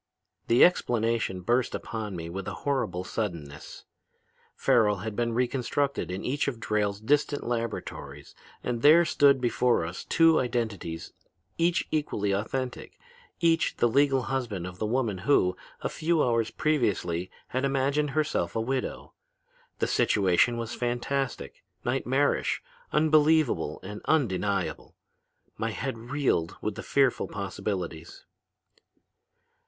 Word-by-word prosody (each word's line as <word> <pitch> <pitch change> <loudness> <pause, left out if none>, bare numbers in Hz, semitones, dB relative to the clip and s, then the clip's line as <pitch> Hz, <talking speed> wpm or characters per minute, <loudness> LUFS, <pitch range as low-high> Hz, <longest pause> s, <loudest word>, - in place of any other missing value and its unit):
"The 120 +2 +7
explanation 115 - 0
burst 120 +6 +1
upon 110 -4 -5
me 85 -1 -5
with 90 +2 -6
a - - -4
horrible 110 -11 0
suddenness. 85 -9 -5 0.7
Farrel 105 -3 +3
had 110 -2 -4
been 115 0 0
reconstructed 125 +2 -1
in 90 +2 -4
each 145 +3 0
of 125 -5 -3
Drayle's 105 -2 -1
distant 145 +5 +1
laboratories, 115 -1 -4 0.3
and 120 -2 -2
there 160 +5 +7
stood 140 -3 +4
before 120 -5 +2
us 85 +2 -6
two 165 -1 +4
identities 110 -9 -3 0.5
each 170 +1 +2
equally 125 -10 0
authentic, 125 +6 -3 0.4
each 165 -1 +2
the 120 - +3
legal 135 +1 +3
husband 120 -9 -3
of 90 0 -8
the 110 - -1
woman 115 -5 0
who, 90 -5 +3 0.3
a - - -1
few 165 0 +1
hours 115 -2 +1
previously, 100 - 0 0.2
had 130 +1 -2
imagined 140 +2 +1
herself 150 - 0
a - - +1
widow. 130 +3 -3 0.6
The - - +1
situation 100 +4 +3
was 115 0 -4
fantastic, 125 +2 -3 0.2
nightmarish, 135 +3 +1 0.3
unbelievable 155 - +3
and 105 +2 -7
undeniable. 100 - 0 0.6
My 115 - 0
head 120 +4 -3
reeled 130 - 0
with 105 - -2
the - - -7
fearful 135 -3 +2
possibilities. 95 -4 -5
120 Hz, 125 wpm, -27 LUFS, 100-140 Hz, 0.7 s, The